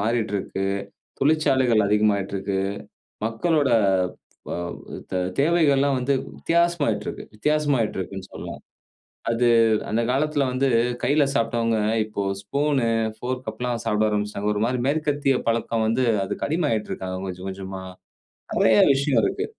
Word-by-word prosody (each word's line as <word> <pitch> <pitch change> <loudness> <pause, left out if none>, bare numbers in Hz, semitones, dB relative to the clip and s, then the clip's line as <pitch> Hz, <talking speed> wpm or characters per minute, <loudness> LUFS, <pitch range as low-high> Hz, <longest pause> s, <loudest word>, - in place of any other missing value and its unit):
மாறிட்டுருக்கு. 105 -3 -1 0.5
தொழிற்சாலைகள் 135 -7 +3
அதிகமாயிட்டுருக்கு. 100 -2 +1 0.7
மக்களோட, 140 +6 +1 0.8
வ - - -3 0.6
தெ 90 - 0 0.2
தேவைகள்லாம் 140 -4 +3
வந்து 135 +3 +1 0.2
வித்தியாசமாயிட்டுருக்கு, 170 -2 0
வித்தியாசமாயிட்டுருக்குன்னு 115 - -1
சொல்லலாம். - - -7 0.7
அது, 120 +1 +2 0.4
அந்த 115 +2 +1
காலத்தில 145 +1 +1
வந்து 130 +2 +1 0.4
கையில 145 +2 +3
சாப்பிட்டவங்க, 115 -1 +1 0.3
இப்போ 105 -1 -4 0.2
ஸ்பூன், 140 +6 0 0.4
ஃபோர்க் 125 +1 -5
அப்பிட்லாம் 120 +1 -3
சாப்பிட 105 +1 +2
ஆரம்பிச்சுட்டாங்க. 105 0 -1
ஒரு 105 - -2
மாரி 125 +1 0
மேற்கத்திய 145 -2 +1
பழக்கம் 115 -1 0
வந்து, 120 +3 +1 0.2
அதுக்கு 95 - -3
அடிமையாயிட்டு 145 -9 0
இருக்காங்க 95 0 -4
கொஞ்சம் 90 +1 -6
கொஞ்சமா. 95 0 -6 0.8
நெறைய 110 -1 +5 0.2
விஷயம் 135 -2 +1
இருக்கு, - - -1
115 Hz, 110 wpm, -24 LUFS, 105-140 Hz, 0.8 s, நெறைய